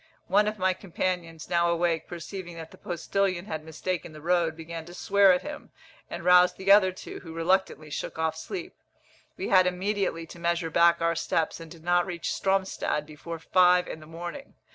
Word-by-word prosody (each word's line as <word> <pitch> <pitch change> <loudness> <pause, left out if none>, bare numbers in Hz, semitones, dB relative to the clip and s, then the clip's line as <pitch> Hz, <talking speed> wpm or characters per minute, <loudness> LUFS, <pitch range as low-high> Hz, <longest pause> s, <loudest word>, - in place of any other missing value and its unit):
One 205 +3 +3
of 215 0 -2
my 185 0 +2
companions, 180 -3 -3
now 170 0 +2
awake, 170 -1 0
perceiving 175 +1 -7
that 160 -1 -8
the - - -14
postillion 185 +1 -1
had 160 -7 -5
mistaken 160 +1 -4
the 155 - -10
road, 170 -2 +1
began 165 0 -7
to 175 +1 -11
swear 200 0 +5
at 180 - +1
him, 295 0 -8 0.4
and 170 0 -6
roused 180 0 +6
the 195 +1 +2
other 200 -2 +7
two, 185 - -9
who 165 -2 -10
reluctantly 165 -3 0
shook - - -4
off 160 0 0
sleep. 360 - -6 0.6
We - - -3
had 185 -1 +6
immediately 185 -2 -1
to 170 - -12
measure 170 -1 0
back 170 +1 +4
our 170 0 +2
steps, 165 0 -1
and 165 -1 -10
did 165 -1 -13
not 175 +1 +2
reach 175 -3 -3
Stromstad 190 -6 0
before 155 +2 -8
five 180 +2 +4
in - - -6
the 155 - -13
morning. 175 - -8
175 Hz, 190 wpm, -27 LUFS, 165-185 Hz, 0.6 s, other